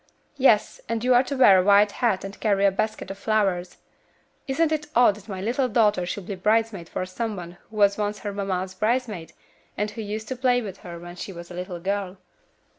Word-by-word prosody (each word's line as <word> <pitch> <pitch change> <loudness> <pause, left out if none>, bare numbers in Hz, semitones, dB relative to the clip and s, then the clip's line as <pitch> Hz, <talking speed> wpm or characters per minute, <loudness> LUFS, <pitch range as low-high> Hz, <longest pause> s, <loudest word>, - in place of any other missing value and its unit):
"Yes, 225 -6 +3
and 230 0 -1
you 255 0 +4
are 245 - +6
to 275 +1 -4
wear 195 -7 +7
a - - +2
white 205 +1 +5
hat 225 -6 0
and 195 0 -8
carry 200 -2 +2
a 200 - +5
basket 195 -1 -3
of 195 - -9
flowers. 195 -5 0 0.7
Isn't 310 +4 +1
it 305 -1 -1
odd 240 -3 +6
that 210 +1 -15
my 190 -2 -5
little 250 +5 0
daughter 210 -6 +2
should 190 +1 -4
be 200 - -4
bridesmaid 210 -2 0
for 185 - -3
some 215 +4 -4
one 175 -1 -9
who 220 - -14
was 200 -1 +3
once 210 0 -1
her 205 -1 -4
mamma's 190 -2 -2
bridesmaid, 215 -4 -1 0.4
and 210 +1 -1
who 225 - -6
used 215 +1 -5
to 260 - -2
play 250 -1 +2
with 200 -5 -6
her 175 -1 -9
when 175 +1 -10
she 195 - -6
was 175 -1 -10
a - - -7
little 180 0 -5
girl?" 195 +1 -3
205 Hz, 220 wpm, -25 LUFS, 185-225 Hz, 0.7 s, wear